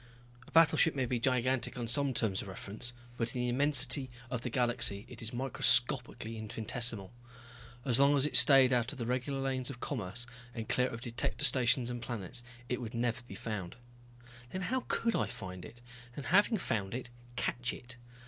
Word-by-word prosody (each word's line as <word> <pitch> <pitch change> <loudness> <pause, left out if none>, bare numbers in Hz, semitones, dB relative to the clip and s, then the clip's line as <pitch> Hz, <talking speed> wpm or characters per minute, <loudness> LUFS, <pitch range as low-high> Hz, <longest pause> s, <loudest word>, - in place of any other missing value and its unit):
A - - -16
battleship 165 -1 +4
may 130 -2 0
be 120 0 -2
gigantic 130 -1 0
on 120 -1 -4
some 140 +4 +3
terms 110 -6 0
of - - -9
reference, 100 +5 -3 0.3
but 115 0 -2
in 125 - -1
the 125 - -1
immensity 140 +1 +3 0.2
of 125 -2 -3
the 125 - -4
galaxy 120 -4 +1
it - - -10
is 115 0 -4
microscopically 125 -2 0
infinitesimal. 110 -1 +2 0.7
As 125 -2 +2
long 140 +1 +4
as 135 - +4
it 145 -4 -2
stayed 135 -2 +8
out 120 -2 0
of 145 - -10
the 120 - -4
regular 125 +3 -2
lanes 130 -2 -1
of 130 -3 -8
commerce, 120 -3 -3 0.3
and 110 -2 -5
clear 125 +1 +1
of 115 -1 -7
detector 120 0 0
stations 125 -1 +3
and 120 -1 -6
planets, 115 -3 -4 0.3
it 125 +1 -3
would 120 0 -7
never 120 0 -1
be - - -9
found. 105 -3 -6 0.7
Then 185 - -5
how 255 +7 -2
could 230 0 0
I - - 0
find 95 -7 -8
it 120 - -13 0.3
and 140 - -7
having 205 +5 +3
found 105 - -3
it, 125 -1 -7 0.2
catch 120 0 -2
it? 125 0 -10
125 Hz, 185 wpm, -32 LUFS, 115-130 Hz, 0.7 s, stayed